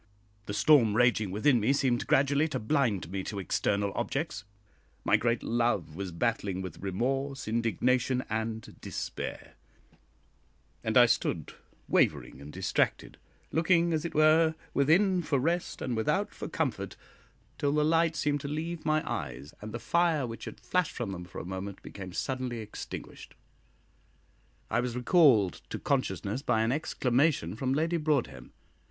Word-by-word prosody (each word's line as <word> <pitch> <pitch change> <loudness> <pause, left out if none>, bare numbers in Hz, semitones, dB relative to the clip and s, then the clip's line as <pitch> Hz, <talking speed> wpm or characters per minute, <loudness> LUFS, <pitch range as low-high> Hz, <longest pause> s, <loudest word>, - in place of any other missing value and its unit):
The 100 - -3
storm 115 -2 +5
raging 120 -4 +3
within 115 +7 +3
me 115 +6 +2
seemed 130 -3 +1
gradually 140 +3 +3
to 155 - -3
blind 110 - 0
me 95 0 -2
to 105 - -5
external 100 +2 0
objects; 105 +2 -3 0.6
my - - +5
great 115 0 +1
love 115 -9 0
was 95 0 -4
battling 100 0 -1
with 95 - -7
remorse, 135 +8 -2
indignation, 125 +3 +1
and 110 0 -4
despair; - - -5 1.3
and - - +1
I - - +9
stood - - 0 0.3
wavering 65 - +1
and 75 +1 -9
distracted, 95 +2 -1 0.3
looking, 170 +1 +3
as 155 -1 0
it 170 - -5
were, 160 +1 +5 0.2
within 180 +6 +3
for 150 -4 0
rest 165 +6 -1
and 125 - -1
without 110 0 0
for - - -6
comfort, - - -2 0.6
till 145 - +1
the 150 0 +2
light 165 +1 +3
seemed 145 -2 0
to 140 - -5
leave 160 +3 -4
my 155 0 +1
eyes, 70 +1 -5
and 110 +1 -7
the 120 - -4
fire 160 +4 +1
which 115 -1 -7
had - - -8
flashed 180 -3 0
from 120 -5 -3
them 90 -2 -6
for 85 - -11
a - - -7
moment 95 +1 -5
became 95 -2 -8
suddenly 130 +4 -3
extinguished. 110 -2 -8 1.3
I - - 0
was 120 -1 -2
recalled 125 - +4
to - - -4
consciousness 105 +7 -1
by 110 -6 +1
an 115 - +1
exclamation 130 - +1
from 130 +3 -1
Lady 165 +3 +1
Broadhem. 150 -5 -1
125 Hz, 150 wpm, -29 LUFS, 105-150 Hz, 1.3 s, I